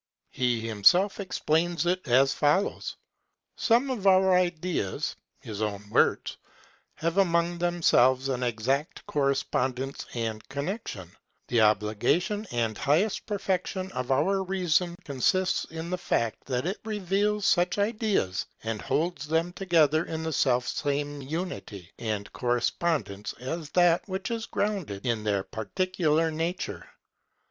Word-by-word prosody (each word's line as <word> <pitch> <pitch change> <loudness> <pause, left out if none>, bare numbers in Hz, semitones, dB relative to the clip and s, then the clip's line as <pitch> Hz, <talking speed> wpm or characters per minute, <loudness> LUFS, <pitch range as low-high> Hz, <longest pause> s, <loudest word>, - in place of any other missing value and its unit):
He 125 -2 +1
himself 175 - +4
explains 175 -3 0
it 180 -2 0
as 130 +3 +4
follows: 150 +7 +1 0.6
Some 245 +4 +2
of 210 -6 -1
our 190 0 +5
ideas 175 - -1 0.3
[his 110 -1 -6
own 105 -1 -3
words] - - +2 0.6
have 165 +4 0
among 170 -2 +2
themselves 135 -7 +3
an 130 -2 -2
exact 125 +5 -1
correspondence 135 -2 -1
and 110 -2 -3
connection. 140 - -5 0.4
The 115 -1 +3
obligation 110 - +1
and 115 -2 0
highest 170 +9 +1
perfection 190 -2 -2
of 125 -5 -4
our 185 +9 +2
reason 180 -2 +1
consists 185 +7 +1
in 160 +2 -7
the 180 - -1
fact 115 - -1
that 125 +1 -2
it 190 +4 -2
reveals 210 0 0
such 175 +1 +3
ideas 205 - 0 0.2
and 110 -1 -3
holds 160 -2 -1
them 165 +3 0
together 165 -5 +3
in 160 0 -4
the 160 0 -2
selfsame 140 +3 0
unity 145 - -5
and 105 -3 -3
correspondence 120 -3 -1
as 150 +4 -5
that 175 -1 +4
which 190 +3 -3
is 230 -1 -3
grounded 190 - -2
in 115 -3 0
their 100 -2 +1
particular 165 - 0
nature. 165 +3 -3
160 Hz, 125 wpm, -27 LUFS, 125-185 Hz, 0.6 s, our